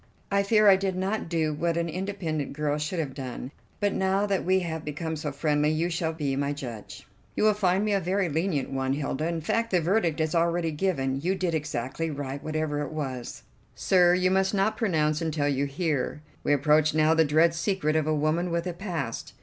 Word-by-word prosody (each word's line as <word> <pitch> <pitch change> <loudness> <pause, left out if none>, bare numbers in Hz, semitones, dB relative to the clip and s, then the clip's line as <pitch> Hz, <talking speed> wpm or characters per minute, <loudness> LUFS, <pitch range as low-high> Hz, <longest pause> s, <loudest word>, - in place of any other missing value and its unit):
I 200 0 +3
fear 215 +1 +4
I 195 -1 +8
did 190 -1 -1
not 190 0 -2
do 160 -2 0
what 165 +2 -1
an 170 0 0
independent 170 -4 -3
girl 150 0 -1
should 150 +4 -3
have 150 -5 -2
done, 130 -1 -6 0.3
but 205 -1 +1
now 190 +1 +1
that 200 -2 0
we 185 +1 +2
have 160 -2 -4
become 160 +2 -4
so 150 -1 -4
friendly 150 +1 +1
you 165 +3 0
shall 165 -1 -1
be 145 -4 -2
my 140 +1 -1
judge." 120 -7 -8 0.3
"You - - 0
will 215 0 +5
find 195 -1 +1
me 210 - +1
a 200 - +3
very 190 +1 0
lenient 160 -3 -1
one, 135 0 -1
Hilda; 145 +2 -2
in 170 -1 -2
fact 230 +8 0
the 180 - +3
verdict 170 -2 +1
is 160 -1 0
already 170 0 +1
given: 140 -5 -1
you 185 +5 0
did 185 -3 -1
exactly 150 0 -2
right 140 -1 -5
whatever 155 -1 -2
it 145 - -4
was." 135 -6 -5 0.3
"Sir, 180 -2 +4
you 185 0 +2
must 190 +1 +2
not 200 +3 +2
pronounce 155 -8 +1
until 155 -3 0
you 140 0 +1
hear. 150 -1 -2 0.2
We - - +1
approach 150 +2 +3
now 155 +1 +4
the 160 0 +4
dread 160 +3 +3
secret 170 -3 0
of 155 -1 +1
a 155 - +2
woman 155 +4 0
with 170 0 -1
a 180 - -3
past. 170 - -5
160 Hz, 215 wpm, -27 LUFS, 150-185 Hz, 0.3 s, I